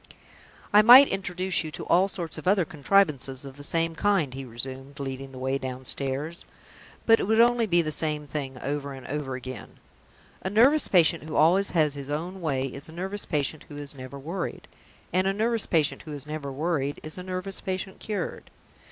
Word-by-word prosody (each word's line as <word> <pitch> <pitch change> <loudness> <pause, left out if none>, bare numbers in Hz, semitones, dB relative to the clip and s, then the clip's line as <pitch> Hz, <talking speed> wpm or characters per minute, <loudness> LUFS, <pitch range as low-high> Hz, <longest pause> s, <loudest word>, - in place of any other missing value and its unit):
"I 210 - +9
might 250 +6 +9
introduce 185 -2 +1
you 160 - -5
to - - -6
all 185 +3 +4
sorts 175 -4 -5
of - - -8
other 190 -2 +4
contrivances 145 -4 +1
of 135 -1 -9
the 145 - -9
same 165 +2 +1
kind," 175 -7 +1
he 135 +1 -6
resumed, 130 +4 -6
leading 135 0 -5
the 130 - -11
way 130 +1 -1
downstairs; 135 +5 -3 0.6
"but 225 0 +6
it - - -1
would 220 +1 +3
be 230 - +8
only 240 -1 +3
the 170 -4 +2
same 150 -1 0
thing 135 -2 -5
over 140 0 -3
and 135 -2 -10
over 140 -2 -4
again. 130 0 -8 0.6
A 190 - -3
nervous 255 +9 +4
patient 170 -4 +3
who 155 - -6
always 180 +6 +4
has 155 -4 +2
his 140 -1 -7
own 175 +6 -4
way 135 -5 0
is 135 +3 -7
a - - -10
nervous 190 +5 -4
patient 150 -1 -1
who 145 - -9
is 145 -1 -7
never 130 0 -9
worried; 170 +6 -5 0.5
and 185 +1 +2
a 195 - +1
nervous 225 +2 0
patient 160 -2 +1
who 155 - -8
is 145 -1 -6
never 150 -2 -5
worried 145 -1 -2
is 155 +3 -7
a - - -5
nervous 185 +1 -5
patient 190 0 -4
cured. 205 -5 -4
155 Hz, 195 wpm, -26 LUFS, 140-190 Hz, 0.6 s, I